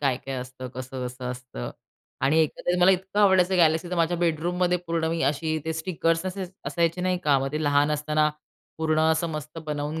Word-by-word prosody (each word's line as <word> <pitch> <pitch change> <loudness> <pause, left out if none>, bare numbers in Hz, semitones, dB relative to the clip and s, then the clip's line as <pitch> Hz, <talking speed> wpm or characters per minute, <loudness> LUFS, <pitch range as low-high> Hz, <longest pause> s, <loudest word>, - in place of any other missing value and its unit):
काय-काय 135 -1 -1
असतं? 130 0 -6
कसं-कसं 125 -1 -5
असतं? 125 - -7 0.5
आणि 140 +5 +3
एकंदरीत 175 +3 0
मला 185 +2 +7
इतकं 190 +2 0
आवडायचं 190 -2 +4
गॅलेक्सी 165 +1 +3
तर - - -1
माझ्या 170 +1 +2
बेडरूममध्ये 175 +2 +1
पूर्ण 165 -1 0
मी 165 -3 -1
अशी 155 +1 -2
ते 160 - -1
स्टिकर्स 165 +1 0
असे 190 0 -3 0.2
असायचे 170 +1 0
नाही 185 0 +1
का 140 -2 +4
मग 135 +2 -3
ते 155 +1 -1
लहान 145 0 +3
असताना 150 +1 +1 0.5
पूर्ण 155 -1 +1
असं 160 +1 +1
मस्त 155 +1 -6
बनवून 150 +1 -3
160 Hz, 180 wpm, -26 LUFS, 145-175 Hz, 0.5 s, मला